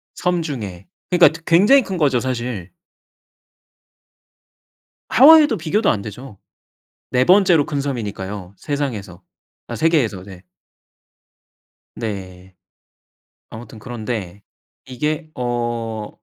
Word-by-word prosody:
섬 180 -1 0
중에. 105 - -6 0.2
그니까 180 - +6
드 165 +1 -11
굉장히 210 +11 +5
큰 190 - -5
거죠 140 -6 +2
사실. 120 -7 -4 2.4
하와이도 300 +3 +7
비교도 190 +7 0
안 100 - 0
되죠. 105 +2 -10 0.7
4 125 0 +2
번째로 180 -5 +5
큰 140 -1 -3
섬이니까요 100 -7 -5
세상에서 110 - -4 0.4
아 - - -6
세계에서 135 - +1
네. 95 -2 -12 1.5
네. 95 -4 -7 0.9
아무튼 110 0 -11
그런데 110 -4 -6 0.4
이게 150 +5 -3
어 120 -3 -3
120 Hz, 200 characters per minute, -20 LUFS, 105-155 Hz, 2.4 s, 하와이도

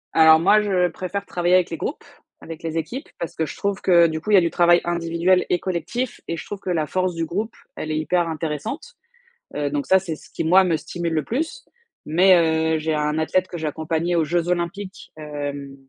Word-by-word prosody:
Alors, 160 0 +7
moi, 205 +5 +5
je 185 -4 +1
préfère 185 +4 -5
travailler 175 -1 +1
avec 185 -1 +3
les 165 - -3
groupes, - - -4 0.4
avec 165 -1 -9
les 165 0 -4
équipes 175 - -4
parce 170 - -5
que 160 - -1
je - - -8
trouve 200 -1 -2
que, 170 -2 +5
du 160 -1 -4
coup, 210 - -7
il - - +7
y - - +8
a - - +6
du 170 - 0
travail 175 0 +5
individuel 170 +1 +1
et 180 - +3
collectif 195 +8 -3
et 165 - -3
je - - -7
trouve 205 - -6
que 190 - -6
la 160 -4 0
force 185 +2 -1
du 165 - -1
groupe, 210 +8 -4 0.2
elle 155 - -5
est 155 - -1
hyper 170 +2 0
intéressante. 165 - -4 0.6
Heu 145 -1 -1
donc 145 0 -2
ça, 190 - +5
c'est 170 -4 -5
ce - - -17
qui, - - -4
moi, 185 +3 +6
me 170 -3 +1
stimule 170 +1 -4
le 155 -1 0
plus. 320 - -3 0.4
Mais 180 +4 +5 0.4
heu, 155 - -1
j'ai 160 0 -1
un 150 +1 -1
athlète 185 +4 +1
que 175 - -6
j'ai 155 -1 -3
accompagné 160 +3 -1
aux 165 - +3
Jeux 170 +2 -1
Olympiques, 180 +3 -4
hem, 145 -2 -6
170 Hz, 230 wpm, -22 LUFS, 160-185 Hz, 0.6 s, y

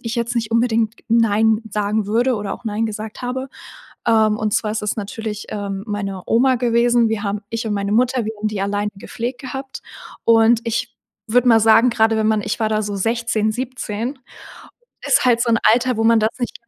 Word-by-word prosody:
ich 230 -1 -4
jetzt 235 +1 -2
nicht 225 -2 -2
unbedingt 230 -1 +1
„nein“ 220 -1 +3
sagen 210 0 -1
würde 240 +4 +1
oder 205 -2 -4
auch - - -15
„nein“ 220 0 -1
gesagt 215 +2 -7
habe. 260 +2 -3 0.6
Ähm, 220 -1 +3
und 215 -1 -2
zwar 215 - 0
ist 215 - -3
es 210 - -2
natürlich, 215 0 -5
ähm, 200 -1 -4
meine 195 -3 -4
Oma 255 +3 +3
gewesen. 235 -1 +2
Wir 220 -1 -2
haben 205 0 -2
ich 230 0 -3
und 210 - -1
meine 200 0 -2
Mutter, 245 +1 +2
wir 220 - -3
haben 215 +1 -1
die 210 -2 -4
alleine 205 +1 -1
gepflegt 240 +5 -5
gehabt. 265 0 -7 0.4
Und 230 0 +5
ich 235 +1 -3 0.3
würde 245 +2 +3
mal 225 -1 +6
sagen, 225 +3 +5
gerade 225 -1 +2
wenn 220 0 +1
man 215 -1 +1
ich - - -3
war 220 - +1
da 215 0 0
so 205 -1 -4
16, 225 +1 0
17, 245 0 -4 0.9
ist - - +3
halt 240 -2 +3
so 235 - 0
'n 230 - +3
Alter, 250 0 +1
wo 225 - +1
man 230 0 +5
das 220 - +2
nicht. 245 - -3
225 Hz, 205 wpm, -20 LUFS, 210-235 Hz, 0.9 s, mal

